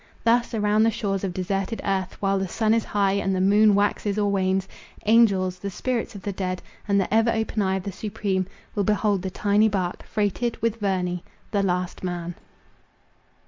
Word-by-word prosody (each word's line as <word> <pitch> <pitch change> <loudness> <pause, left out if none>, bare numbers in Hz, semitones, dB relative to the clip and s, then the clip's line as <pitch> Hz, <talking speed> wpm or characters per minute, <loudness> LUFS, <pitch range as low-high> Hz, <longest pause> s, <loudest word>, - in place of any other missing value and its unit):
Thus 235 +1 +2
around 210 0 +2
the 225 - +5
shores 205 -4 -2
of 195 - -1
deserted 195 +4 -2
earth, 190 -2 -1
while 195 -1 +1
the 190 - -1
sun 220 +4 +1
is 230 -1 +1
high, 200 -2 +1
and 195 -1 0
the - - 0
moon 205 +2 +5
waxes 205 0 +1
or 205 -1 +1
wanes, 190 0 +1 0.4
angels, 200 -5 +4
the 200 - -4
spirits 235 +3 -3
of 200 - -9
the 205 - -2
dead, 185 -1 -3 0.3
and 200 -1 +3
the 195 - -1
ever 225 +1 +4
open 220 -1 0
eye 190 -1 +1
of 190 - -3
the 200 - -4
Supreme, 200 -2 -2 0.3
will 205 - 0
behold 210 -1 +1
the 190 - -3
tiny 205 +3 +2
bark, 185 -3 -2
freighted 215 +3 -1
with 230 -1 0
Verney—the 185 0 -2
LAST 180 -1 -1
MAN. 175 -1 -3
200 Hz, 185 wpm, -24 LUFS, 190-215 Hz, 0.4 s, the